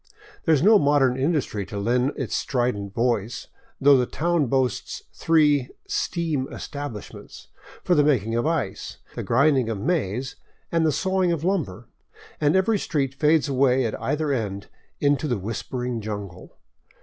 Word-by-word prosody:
There 160 Hz, -, +5 dB
is 145 Hz, -, 0 dB
no 210 Hz, +1 st, +7 dB
modern 140 Hz, -3 st, +3 dB
industry 135 Hz, -7 st, -1 dB
to 105 Hz, -, -6 dB
lend 125 Hz, +6 st, +1 dB
its 130 Hz, -7 st, -3 dB
strident 120 Hz, -6 st, -1 dB
voice, 115 Hz, -1 st, -1 dB, 0.3 s
though 140 Hz, 0 st, +6 dB
the 125 Hz, -1 st, +1 dB
town 170 Hz, -3 st, 0 dB
boasts 130 Hz, -2 st, -1 dB
three 150 Hz, -5 st, +3 dB
" -, -, -39 dB, 0.2 s
steam 160 Hz, -6 st, -2 dB
es -, -, -7 dB
tablishments 140 Hz, -7 st, -8 dB
*' -, -, -19 dB
for 180 Hz, -, +2 dB
the 150 Hz, -3 st, +4 dB
making 115 Hz, -7 st, +1 dB
of 120 Hz, +5 st, 0 dB
ice, 145 Hz, -13 st, -3 dB, 0.2 s
the -, -, -5 dB
grinding 135 Hz, -1 st, +2 dB
of 110 Hz, -, -2 dB
maize, 130 Hz, -, -2 dB, 0.3 s
and 165 Hz, -1 st, +2 dB
the -, -, +3 dB
sawing 185 Hz, +4 st, +1 dB
of 165 Hz, -2 st, -2 dB
lumber, 135 Hz, -, -2 dB, 0.5 s
and 150 Hz, +2 st, +2 dB
every 200 Hz, +3 st, +2 dB
street 140 Hz, -7 st, -1 dB
fades 150 Hz, +2 st, +2 dB
away 130 Hz, -2 st, +2 dB
at 110 Hz, -, -4 dB
either 150 Hz, +1 st, -1 dB
end 100 Hz, -6 st, -3 dB, 0.3 s
into 145 Hz, 0 st, +1 dB
the 120 Hz, -5 st, 0 dB
whispering 115 Hz, +4 st, -4 dB
jungle. 100 Hz, -4 st, -7 dB
135 Hz, 160 wpm, -24 LUFS, 115-155 Hz, 0.5 s, no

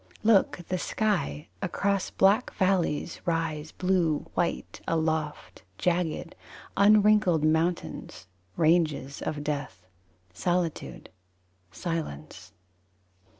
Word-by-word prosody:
Look, 215 Hz, -3 st, +4 dB
the 185 Hz, -1 st, -1 dB
sky! 175 Hz, -9 st, -1 dB
Across 195 Hz, +1 st, 0 dB
black 200 Hz, +6 st, +3 dB
valleys 180 Hz, -5 st, 0 dB
Rise 160 Hz, -2 st, -1 dB
blue 180 Hz, -5 st, +1 dB
white 175 Hz, -1 st, -2 dB
aloft 160 Hz, -2 st, -2 dB, 0.2 s
Jagged, 175 Hz, -1 st, -1 dB, 0.4 s
unwrinkled 205 Hz, -5 st, +5 dB
mountains, 160 Hz, -, -1 dB, 0.3 s
ranges 155 Hz, -4 st, +2 dB
of 150 Hz, -1 st, -3 dB
death. 145 Hz, -12 st, -4 dB, 0.5 s
Solitude. 175 Hz, -, -2 dB, 0.6 s
Silence. 90 Hz, -, -5 dB
165 Hz, 80 wpm, -27 LUFS, 150-185 Hz, 0.6 s, unwrinkled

